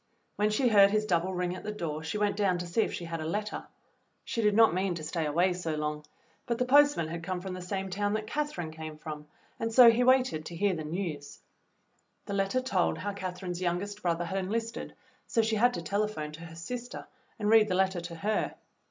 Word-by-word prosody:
When 210 Hz, +1 st, +2 dB
she 230 Hz, +5 st, +2 dB
heard 200 Hz, -2 st, +7 dB
his 215 Hz, +1 st, +1 dB
double 180 Hz, -2 st, +1 dB
ring 180 Hz, -1 st, -2 dB
at -, -, -7 dB
the 210 Hz, -, -3 dB
door 165 Hz, -7 st, -4 dB
she 160 Hz, +5 st, -3 dB
went 205 Hz, -1 st, +1 dB
down 195 Hz, -3 st, +2 dB
to 175 Hz, -, -4 dB
see 175 Hz, +6 st, +1 dB
if -, -, 0 dB
she 175 Hz, -, -5 dB
had 165 Hz, -1 st, -4 dB
a -, -, -3 dB
letter. 205 Hz, +5 st, -3 dB, 0.6 s
She 230 Hz, -, -2 dB
did 210 Hz, -2 st, +3 dB
not 225 Hz, -3 st, +6 dB
mean 185 Hz, 0 st, 0 dB
to 160 Hz, -, -6 dB
stay 160 Hz, 0 st, -2 dB
away 175 Hz, +5 st, +2 dB
so 170 Hz, -3 st, -3 dB
long, 150 Hz, 0 st, -3 dB, 0.4 s
but 235 Hz, -1 st, 0 dB
the 250 Hz, -, +1 dB
postman 285 Hz, -, +5 dB
had 165 Hz, +1 st, -5 dB
come 180 Hz, +2 st, -3 dB
from 185 Hz, +1 st, -6 dB
the 185 Hz, -, -6 dB
same 190 Hz, +1 st, -4 dB
town 205 Hz, +2 st, 0 dB
that 215 Hz, 0 st, -2 dB
Catherine 255 Hz, -, -3 dB
came 155 Hz, -1 st, -8 dB
from, 150 Hz, -1 st, -7 dB, 0.3 s
and 225 Hz, 0 st, -1 dB
so 235 Hz, 0 st, +9 dB
he 235 Hz, +2 st, +2 dB
waited 255 Hz, -10 st, +3 dB
to 170 Hz, -, -7 dB
hear 200 Hz, +3 st, +2 dB
the 160 Hz, -3 st, -4 dB
news; 155 Hz, -3 st, -5 dB, 0.9 s
the 200 Hz, -, -5 dB
letter 195 Hz, +6 st, +1 dB
told 195 Hz, -9 st, +1 dB
EVELYN'S -, -, -7 dB
WAR 205 Hz, -, -1 dB
WORK 200 Hz, -, -10 dB
'47 -, -, -7 dB
how -, -, +1 dB
Catherine's 180 Hz, -1 st, -6 dB
youngest 185 Hz, +4 st, -2 dB
brother 175 Hz, -1 st, 0 dB
had 195 Hz, +3 st, -2 dB
enlisted, 225 Hz, +4 st, -3 dB, 0.3 s
so 225 Hz, -, +2 dB
she 220 Hz, 0 st, +1 dB
had 245 Hz, +1 st, +4 dB
to 170 Hz, -, -4 dB
telephone 200 Hz, -4 st, -2 dB
to 165 Hz, +2 st, -10 dB
her 165 Hz, 0 st, -11 dB
sister 245 Hz, +9 st, -6 dB, 0.3 s
and 210 Hz, -2 st, 0 dB
read 220 Hz, -1 st, +7 dB
the 185 Hz, -, 0 dB
letter 190 Hz, -1 st, +1 dB
to 170 Hz, 0 st, -7 dB
her. 205 Hz, +6 st, -1 dB
190 Hz, 240 wpm, -29 LUFS, 170-215 Hz, 0.9 s, so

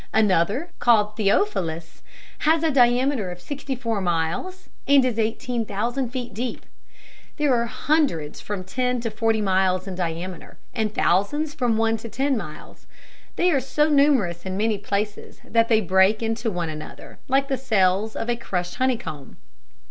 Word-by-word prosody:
Another, 215 Hz, -, +2 dB
called 210 Hz, -3 st, +3 dB
"Theophilus," 195 Hz, -, 0 dB, 0.4 s
has 320 Hz, +1 st, +2 dB
a 320 Hz, -, +2 dB
diameter 245 Hz, -4 st, +3 dB
of 175 Hz, 0 st, -7 dB
sixty 275 Hz, +6 st, -5 dB
four 230 Hz, -5 st, -2 dB
miles, 175 Hz, -, -2 dB, 0.2 s
and 280 Hz, -2 st, +6 dB
is 235 Hz, -3 st, -1 dB
eighteen 230 Hz, +2 st, -1 dB
thousand 235 Hz, +5 st, -2 dB
feet 245 Hz, -2 st, -5 dB
deep. 240 Hz, +4 st, -4 dB, 0.7 s
There 295 Hz, -3 st, +2 dB
are 235 Hz, -1 st, +1 dB
hundreds 260 Hz, -, 0 dB
from 205 Hz, -3 st, -4 dB
ten 250 Hz, +6 st, -1 dB
to 230 Hz, -1 st, -3 dB
forty 220 Hz, 0 st, +1 dB
miles 190 Hz, -1 st, +1 dB
in 190 Hz, -, -4 dB
diameter, 175 Hz, 0 st, -5 dB, 0.2 s
and 220 Hz, -2 st, -1 dB
thousands 285 Hz, -, +1 dB
from 245 Hz, -7 st, 0 dB
one 225 Hz, 0 st, +2 dB
to 230 Hz, +1 st, -8 dB
ten 270 Hz, +4 st, 0 dB
miles. 225 Hz, -, -8 dB, 0.5 s
They 360 Hz, 0 st, +3 dB
are 280 Hz, -, +3 dB
so 295 Hz, +4 st, +1 dB
numerous 265 Hz, -, +3 dB
in 190 Hz, 0 st, -4 dB
many 215 Hz, 0 st, +1 dB
places 205 Hz, +1 st, -4 dB
that 230 Hz, 0 st, +2 dB
they 220 Hz, -2 st, +3 dB
break 190 Hz, +3 st, +3 dB
into 225 Hz, +1 st, -1 dB
one 175 Hz, -5 st, -3 dB
another, 155 Hz, 0 st, -9 dB
like 275 Hz, +1 st, +2 dB
the 275 Hz, -, 0 dB
cells 215 Hz, -4 st, +1 dB
of 225 Hz, -, -3 dB
a 240 Hz, -, +1 dB
crushed 180 Hz, -6 st, -3 dB
honeycomb. 240 Hz, -, -2 dB
225 Hz, 160 wpm, -23 LUFS, 190-260 Hz, 0.7 s, and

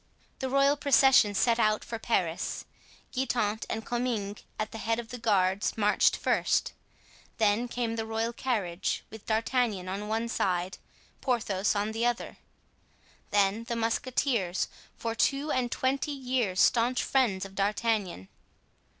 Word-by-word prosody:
The 265 Hz, -, -2 dB
royal 275 Hz, +2 st, +3 dB
procession 270 Hz, -7 st, +5 dB
set 235 Hz, +3 st, +3 dB
out 215 Hz, -1 st, +2 dB
for 230 Hz, -, -6 dB
Paris. 180 Hz, -8 st, -1 dB, 0.5 s
Guitant 235 Hz, -4 st, -1 dB
and 220 Hz, 0 st, -3 dB
Comminges, 235 Hz, -5 st, -2 dB, 0.2 s
at 215 Hz, 0 st, -3 dB
the 225 Hz, -, -7 dB
head 225 Hz, +1 st, 0 dB
of 235 Hz, -1 st, -6 dB
the 245 Hz, -, -7 dB
guards, 200 Hz, -3 st, +1 dB
marched 210 Hz, -1 st, +3 dB
first; -, -, +1 dB, 0.6 s
then 220 Hz, +2 st, +2 dB
came 235 Hz, -1 st, -2 dB
the 225 Hz, -, -2 dB
royal 225 Hz, +1 st, -1 dB
carriage, 205 Hz, -8 st, -2 dB
with 220 Hz, -1 st, -11 dB
D'Artagnan 220 Hz, -3 st, 0 dB
on 200 Hz, +3 st, -4 dB
one 225 Hz, +2 st, -1 dB
side, 185 Hz, -4 st, -1 dB, 0.4 s
Porthos 215 Hz, -6 st, 0 dB
on 205 Hz, +1 st, 0 dB
the 230 Hz, +2 st, 0 dB
other; 240 Hz, 0 st, -3 dB, 0.9 s
then 205 Hz, +2 st, +2 dB
the 235 Hz, 0 st, -3 dB
musketeers, 230 Hz, -4 st, 0 dB, 0.3 s
for 230 Hz, -1 st, -3 dB
two 275 Hz, +6 st, +1 dB
and 245 Hz, -2 st, 0 dB
twenty 270 Hz, +3 st, 0 dB
years 250 Hz, -8 st, -1 dB
staunch 245 Hz, +1 st, +3 dB
friends 215 Hz, -8 st, +1 dB
of 195 Hz, -, -10 dB
D'Artagnan. 200 Hz, -, -1 dB
225 Hz, 140 wpm, -29 LUFS, 205-245 Hz, 0.9 s, procession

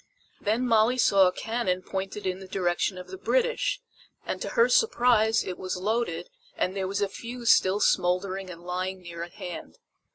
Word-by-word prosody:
Then 225 Hz, +5 st, +1 dB
Molly 230 Hz, +1 st, +3 dB
saw 195 Hz, -6 st, +5 dB
a -, -, +2 dB
cannon 190 Hz, -3 st, -2 dB
pointed 195 Hz, +2 st, -4 dB
in 185 Hz, 0 st, -1 dB
the 190 Hz, -, -10 dB
direction 185 Hz, 0 st, 0 dB
of 180 Hz, -, -9 dB
the 380 Hz, -, -8 dB
British, -, -, +1 dB, 0.5 s
and -, -, -4 dB
to -, -, -3 dB
her 470 Hz, +1 st, +6 dB
surprise 240 Hz, -, +3 dB
it 180 Hz, -, -6 dB
was 185 Hz, -1 st, -3 dB
loaded 225 Hz, -, -1 dB, 0.3 s
and 185 Hz, -, 0 dB
there 190 Hz, -1 st, -1 dB
was 200 Hz, +2 st, -2 dB
a -, -, +1 dB
fuse 235 Hz, +3 st, -1 dB
still 190 Hz, +2 st, +4 dB
smoldering 185 Hz, +1 st, +1 dB
and 170 Hz, -1 st, -10 dB
lying 185 Hz, +1 st, -3 dB
near 170 Hz, -1 st, -8 dB
at 170 Hz, 0 st, -7 dB
hand. 180 Hz, -5 st, -8 dB
195 Hz, 185 wpm, -27 LUFS, 185-230 Hz, 0.5 s, her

